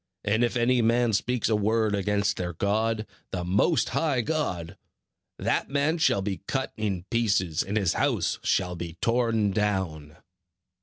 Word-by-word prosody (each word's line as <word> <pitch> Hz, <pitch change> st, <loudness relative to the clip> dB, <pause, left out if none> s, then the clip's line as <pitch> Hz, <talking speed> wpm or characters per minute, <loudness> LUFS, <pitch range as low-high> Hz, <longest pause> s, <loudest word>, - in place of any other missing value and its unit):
And 110 Hz, +3 st, +2 dB
if 120 Hz, -, 0 dB
any 120 Hz, +1 st, +3 dB
man 115 Hz, 0 st, +2 dB
speaks 125 Hz, +4 st, 0 dB
a 110 Hz, -, +2 dB
word 110 Hz, +1 st, +1 dB
against 100 Hz, 0 st, 0 dB
their 90 Hz, -1 st, -3 dB
God, 110 Hz, +4 st, 0 dB, 0.2 s
the 90 Hz, -1 st, -3 dB
Most 100 Hz, -, +2 dB
High 145 Hz, -6 st, +1 dB
God, 100 Hz, -, -2 dB, 0.6 s
that -, -, -1 dB
man 145 Hz, +4 st, +1 dB
shall 100 Hz, -11 st, +2 dB
be 95 Hz, -1 st, -3 dB
cut 135 Hz, 0 st, -2 dB
in 100 Hz, -5 st, -2 dB
pieces, 100 Hz, -8 st, +1 dB
and 100 Hz, +3 st, -2 dB
his 95 Hz, -6 st, +2 dB
house -, -, 0 dB
shall 90 Hz, -1 st, 0 dB
be 85 Hz, 0 st, -7 dB
torn 115 Hz, -3 st, +1 dB
down." 95 Hz, -7 st, -2 dB
105 Hz, 155 wpm, -26 LUFS, 95-120 Hz, 0.6 s, any